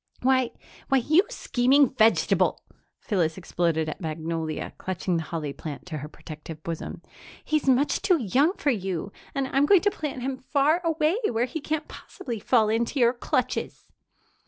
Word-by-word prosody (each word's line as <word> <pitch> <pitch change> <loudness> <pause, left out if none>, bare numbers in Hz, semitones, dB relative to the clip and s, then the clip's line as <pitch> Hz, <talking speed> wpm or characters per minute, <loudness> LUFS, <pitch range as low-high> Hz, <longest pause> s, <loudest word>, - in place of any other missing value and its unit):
"Why 260 -1 +3 0.4
why, 270 - +4
you 310 - +3
scheming 265 - +3
vegetable!" 200 -5 +3 0.4
Phyllis 170 -6 0
exploded 170 -3 0
at 155 - -5
Magnolia, 160 -1 -3
clutching 185 -1 -2
the - - -1
holly 155 -3 -4
plant 145 +1 -7
to 160 -4 -5
her 150 +2 -7
protective 155 0 -10
bosom. 165 -1 -5 0.4
"He's 305 -2 0
much 265 +3 +3
too 375 -4 +3
young 270 - +2
for 300 -7 0
you, 195 -4 -3 0.2
and 275 -1 0
I'm 275 +2 +3
going 390 -1 +6
to 410 - +2
plant 285 -8 -5
him 265 0 -2
far 290 +6 +2
away, 325 +2 +1
where 235 +1 +1
he 305 +5 -5
can't 305 +1 -2
possibly 235 -5 -7
fall 220 +1 +3
into 230 +5 0
your 240 0 +5
clutches." 255 +1 -2
240 Hz, 160 wpm, -26 LUFS, -, 0.4 s, going